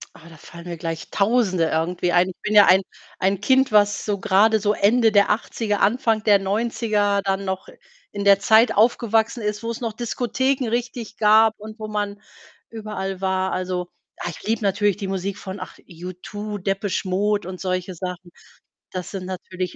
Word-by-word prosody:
Ah, 165 - -15
da 165 - -14
fallen 170 +3 -13
mir 170 - -5
gleich 165 0 -5
Tausende 200 -5 +2
irgendwie 170 +2 -1
ein. 180 +1 +3
Ich 185 - -11
bin 210 0 -2
ja 205 - +9
ein 190 +1 +6 0.4
ein 195 +1 0
Kind, 265 +3 +3
was 205 -1 +3
so 205 -2 -1
grade 215 +2 +3
so 210 0 +1
Ende 225 +2 +3
der 200 -1 +4
80er, 210 -1 -1
Anfang 220 0 +2
der 205 -2 +5
90er, 205 0 0
dann 195 0 -1
noch 190 0 -4 0.4
in 200 -1 -4
der 200 -1 +6
Zeit 220 +3 +4
aufgewachsen 225 +1 +2
ist, 210 +1 -3
wo's 230 +1 -4
noch 230 -2 -3
Diskotheken 250 +3 -1
richtig 240 -2 -4
gab 220 +1 +5
und 215 +1 -10
wo 215 - -5
man 205 -1 -3 0.5
überall 195 -4 -5
war. 190 0 0
Also, 180 -1 -3 0.3
ah, - - -3
ich 170 - -10
liebe 225 +1 0
natürlich 205 0 +1
die 200 -2 -5
Musik 195 +1 -3
von, 190 -1 -7
ach 185 - -9
U2, 185 +4 -7
Depeche 195 +1 -2
Mode 205 +1 0
und 185 -1 -8
solche 185 0 -2
Sachen. 180 0 -7 0.6
Das 185 -1 -6
sind 190 -2 -5
natürlich 185 -1 -5
200 Hz, 180 wpm, -22 LUFS, 185-220 Hz, 0.6 s, ja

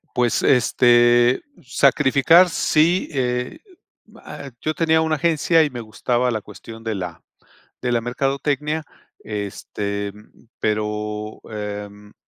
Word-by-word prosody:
Pues, 120 -1 +1
este, 120 0 +4 0.2
sacrificar, 140 +6 +4
sí. 165 +3 +2
Eh, 125 - -2 0.5
mm, - - -20
ah, 140 - -9
yo 155 - -2
tenía 160 0 +2
una 160 -1 +1
agencia 165 +1 +3
y 150 - -1
me 125 -3 -7
gustaba 120 +3 -1
la 110 -2 -2
cuestión 115 +2 -12
de 110 -1 -2
la 90 -4 -6 0.6
de 125 - -1
la 120 - +2
mercadotecnia, 140 +5 -2 0.4
este, 100 -1 -4
mm, 105 +3 -20 0.2
pero, 105 0 -3
em, 105 -1 -7
120 Hz, 120 wpm, -21 LUFS, 105-145 Hz, 0.6 s, este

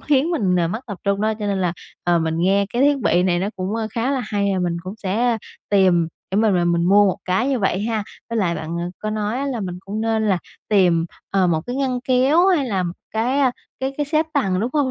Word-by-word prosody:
khiến 295 +3 +2
mình, 195 - +1
ờ, 170 -2 +2
mất 220 +6 -3
tập 205 -5 -6
trung 200 0 +1
đó. 220 +1 +1
Cho 210 - -3
nên 195 -1 0
là, 175 -2 +1 0.3
ờ, 175 -1 +3
mình 160 0 -1
nghe 195 +2 +3
cái 245 +3 +1
thiết 285 -1 +4
bị 180 -6 +2
này 180 -2 +2
nó 195 +3 -1
cũng, 190 +3 -3
ơ, 225 -1 -1
khá 235 +4 -1
là 270 -2 0
hay 200 -2 0
và - - 0
mình 175 -1 -1
cũng 185 +3 -6
sẽ 225 +4 +1 0.3
tìm 185 -4 +4 0.2
để - - +1
mà 220 0 +4
mà 180 -3 +2
mình 170 0 +2
mua 200 +2 +5
một 190 - +1
cái 190 +9 +1
như 265 -3 +1
vậy 195 -1 0
ha. 220 -1 -1 0.3
Với 230 - -1
lại 175 -5 +1
bạn, 165 +2 -4
à, - - -2
có 215 - -3
nói 215 +2 -2
á 280 - -2
là 250 -5 -2
mình 180 -2 -4
cũng 205 +2 -4
nên 220 -1 +1
là 190 - +2 0.3
tìm, 175 -5 +3 0.2
ờ, 190 -2 +3
một 160 -2 +1
cái 245 - -3
ngăn 260 -2 -1
kéo 265 +8 +3
hay 325 -8 +3
là 195 -5 0
một 175 -1 -3 0.2
cái, 240 +5 0
a, 265 - +4 0.3
cái 265 +1 -1
cái 295 -1 -1
xếp 310 +1 +1
tầng, 190 -9 +1
đúng 235 +3 -1
không? 285 -3 +1
205 Hz, 270 wpm, -21 LUFS, 185-250 Hz, 0.3 s, mua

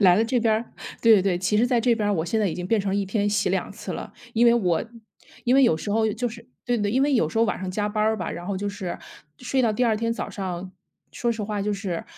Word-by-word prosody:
来 180 -3 +6
了 220 - +3
这 240 +1 +1
边 225 -1 +3
儿 225 +2 -1 0.4
对 230 -1 +7
对 195 - +4
对， 185 -2 +1
其 190 +3 +1
实 235 - +4
在 245 -1 +2
这 235 0 +3
边 215 -2 -1
儿 205 - +2
我 160 - -1
现 215 +6 0
在 200 - +2
已 - - -3
经 180 0 -4
变 220 +2 +2
成 195 -1 -1
1 200 0 0
天 205 +1 0
洗 205 - +1
2 - - -1
次 - - -7
了， - - -7 0.2
因 235 +2 +4
为 235 - +6
我 180 -8 +1 0.6
因 245 - +3
为 270 - +6
有 160 -11 +4
时 205 - -5
候 220 +1 +2
就 245 +4 -2
是 230 0 -8 0.2
对 245 -1 0
对， 205 -1 0
因 260 +4 +2
为 285 0 +2
有 165 -12 +3
时 - - -8
候 225 - +4
晚 215 - -2
上 190 -1 -3
加 205 +2 -1
班 210 0 -1
儿 220 +1 +2
吧， 180 -5 -4
然 175 - -6
后 200 -1 -2
就 205 - -3
是 195 -4 -5 0.4
睡 260 +1 -1
到 235 -3 +3
第 245 +4 +1
2 225 - +3
天 230 +2 -1
早 - - -5
上， 185 -3 -5 0.4
说 240 - -1
实 225 -2 -3
话 205 0 -3
就 210 - 0
是 195 -4 -4
210 Hz, 310 characters per minute, -24 LUFS, 190-230 Hz, 0.6 s, 对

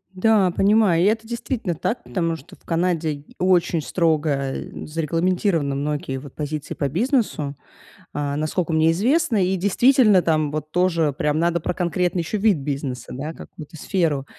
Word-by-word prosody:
Да, 200 -1 +3
понимаю. 195 -3 +3
И - - +3
это 220 +2 +1
действительно 235 -6 -3
так, 235 +9 -2
потому 165 -3 -1
что 145 - -13
в - - -31
Канаде 165 -4 -1
очень 180 -2 +2
строго, 160 -2 +1 0.2
э, - - -7
зарегламентированы 165 -1 0
многие 140 -1 -2
вот 135 0 -10
позиции 150 0 -4
по 140 - -2
бизнесу, 200 - 0 0.6
а, 145 -1 -2
насколько 160 +3 -1
мне 160 +1 +3
известно. 235 - +2
И 190 +1 0
действительно, 210 +1 +4
там 155 -3 +1
вот 155 0 -5
тоже 170 -4 +2
прям 150 +1 0
надо 170 +1 +1
про 165 - -2
конкретный 175 0 0
ещё 165 +6 -3
вид 205 -4 +3
бизнеса, 135 -3 -4
да, 150 +5 -5
какую-то 160 0 -11
сферу 160 -4 -1
165 Hz, 160 wpm, -22 LUFS, 150-190 Hz, 0.6 s, действительно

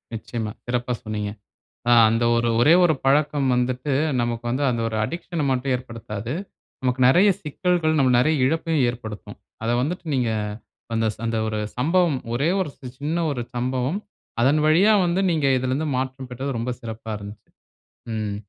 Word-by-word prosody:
நிச்சயமா. 110 -1 -4
சிறப்பா 125 0 -1
சொன்னீங்க. 105 -2 -3 0.6
ஆ - - +6 0.2
அந்த 115 +1 +1
ஒரு 120 0 +1
ஒரே 150 +7 +6
ஒரு 165 -3 +4
பழக்கம் 140 0 +2
வந்துட்டு 125 +3 -1 0.3
நமக்கு 120 0 -2
வந்து 130 +4 -1
அந்த 120 -1 -1
ஒரு 110 - -4
அடிக்ஷன்ன 170 +3 -3
மட்டும் 130 +1 0
ஏற்படுத்தாது. 115 -2 -6 0.5
நமக்கு 125 0 0
நிறைய 185 +9 +6
சிக்கல்கள் 160 +1 0
நமக்கு 130 -3 +4
நிறைய 155 +5 +3
இழப்பையும் 160 0 +1
ஏற்படுத்தும். 110 -3 -8 0.3
அத 115 - 0
வந்துட்டு 175 +5 -3
நீங்க 125 -3 +1 0.6
அந்த 115 0 +1
ச - - -21
அந்த 115 0 -1
ஒரு 110 -1 -2 0.2
சம்பவம் 165 +4 +2 0.2
ஒரே 140 +6 +1
ஒரு 185 - -2 0.3
சின்ன 155 +4 -1
ஒரு 125 -4 -2
சம்பவம் 130 +7 -1 0.4
அதன் 135 +5 +4
வழியா 180 +8 +5
வந்து 175 +2 +1
நீங்க 155 -4 +1
இதில 130 0 -1
இருந்து 150 +4 -1
மாற்றம் 130 0 -4
பெற்றது 130 +3 -4
ரொம்ப 115 +2 -2
சிறப்பா 115 -1 -7
இருந்தது. 100 +1 -11 0.7
ம். 105 -2 -2
130 Hz, 160 wpm, -23 LUFS, 115-155 Hz, 0.7 s, ஆ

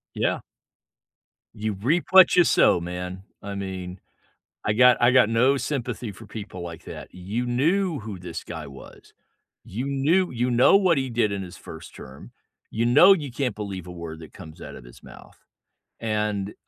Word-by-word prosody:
Yeah. - - 0 1.2
You 110 0 -3
reap 135 - 0
what 190 -2 +7
you 175 - +7
sow, 90 - +4
man, 90 +2 -6 0.2
I 100 -1 -6
mean, 95 -2 -6 0.7
I 105 - +1
got 125 +2 +6
I 120 +1 +5
got 130 -4 +5
no 125 +5 +3
sympathy 125 -5 -4
for 110 +3 -13
people 105 -4 -8
like 85 -2 -8
that. - - -9
You 100 +7 -4
knew 160 +7 0
who 105 -4 -8
this 85 -2 -7
guy 80 -2 -8
was. 70 -1 -14 0.5
You 120 +7 -5
knew 145 +7 +1
you 125 0 -1
know 125 +10 +6
what 185 -5 +2
he 130 -1 -1
did 115 -3 0
in 100 -1 -3
his 90 -2 -9
1st - - -11
term. 65 +1 -12 0.4
You 115 +2 -1
know 175 +11 +7
you 150 -8 -4
can't 125 -2 -2
believe 100 -4 -6
a - - -8
word 85 -2 -8
that 80 -3 -13
comes 80 -5 -12
out - - -9
of - - -12
his - - -16
mouth. - - -15 0.6
And, 105 -2 -2
110 Hz, 180 wpm, -24 LUFS, 90-130 Hz, 1.2 s, what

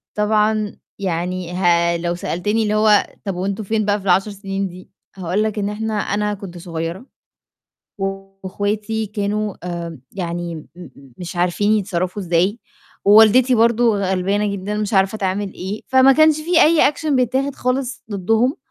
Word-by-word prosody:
طبعًا 210 0 +1 0.2
يعني 180 -1 -3
ها 170 -1 +2
لو 170 0 -2
سألتني 205 +5 -1
اللي 210 -1 0
هو 215 -1 +4 0.2
طب 195 -3 -2
وأنتم 195 +4 -3
فين 215 +2 0
بقى 205 0 +1
في 195 - -12
ال10 195 +2 +2
سنين 195 -1 -4
دي؟ 180 +1 -13 0.3
هاقول 185 +2 -1
لك 215 0 -2
إن 200 -1 -1
إحنا 220 +1 -3
أنا 210 0 -1
كنت 190 -3 -9
صغيّرة، 170 +5 -5 0.9
و 195 - -2 0.4
واخواتي 210 +3 -2
كانوا 210 0 -2
آآ 170 -3 -5
يعني 175 -2 -4
م 155 - -9
م 140 -7 -14
مش 175 0 -7
عارفين 180 +4 +1
يتصرّفوا 195 -2 -1
إزاي، 180 +5 +1 0.5
ووالدتي 220 +5 +6
برضو 230 -1 +3
غلبانة 200 +2 0
جدًا 200 +1 -4
مش 210 0 -2
عارفة 195 +2 +2
تعمل 195 0 -2
إيه، 195 +4 -5
فما 260 +1 +6
كانش 310 +1 +5
في 335 +2 +3
أي 310 -2 +5
action 310 +2 -5
بيتاخد 260 +3 0
خالص 255 +1 -2
ضدهم، 225 +7 +1
205 Hz, 155 wpm, -19 LUFS, 180-220 Hz, 0.9 s, ووالدتي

